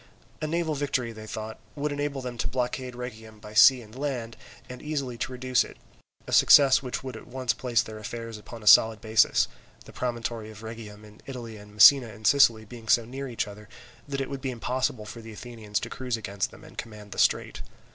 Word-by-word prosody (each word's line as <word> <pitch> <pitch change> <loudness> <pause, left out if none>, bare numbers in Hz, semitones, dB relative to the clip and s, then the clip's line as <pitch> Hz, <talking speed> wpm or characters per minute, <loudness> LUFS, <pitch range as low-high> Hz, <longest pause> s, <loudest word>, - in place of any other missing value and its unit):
A 155 - -1
naval 165 0 0
victory, 135 -5 -1
they 110 -1 -10
thought, 110 0 -6 0.2
would 150 +1 -2
enable 145 -2 -3
them 125 -1 -5
to - - 0
blockade 125 0 -3
Rhegium 110 -3 -8
by 105 0 -11
sea 120 +3 +7
and 110 0 -16
land, 130 -5 -3 0.3
and 125 0 -9
easily 140 -5 -3
to - - -2
reduce 130 0 +1
it; - - -12 0.5
a - - -8
success 135 -2 +7
which 130 -1 -4
would 130 -3 -6
at - - -11
once 125 -2 -1
place 120 0 +1
their 110 0 -9
affairs 115 +1 -6
upon 110 +2 -11
a - - -12
solid 110 +1 +7
basis, 110 0 +3 0.4
the - - -13
promontory 120 -3 -3
of 110 0 -12
Rhegium 110 -2 -9
in 105 0 -16
Italy 120 -4 -7
and 105 0 -13
Messina 125 +4 +8
in 110 0 -11
Sicily 115 -6 +5
being 115 0 -11
so 115 +1 +4
near 135 +3 -6
each 120 -4 -2
other 105 +1 -11 0.4
that 140 -1 -3
it 135 - -2
would 135 -1 -5
be 135 - -2
impossible 125 -2 -2
for 115 +2 -9
the 110 0 -10
Athenians 110 -2 -4
to - - -5
cruise 125 -2 -3
against 100 -2 -3
them - - -15
and - - -11
command 105 -3 -9
the - - -6
strait. - - +1
115 Hz, 215 wpm, -27 LUFS, 110-130 Hz, 0.5 s, Messina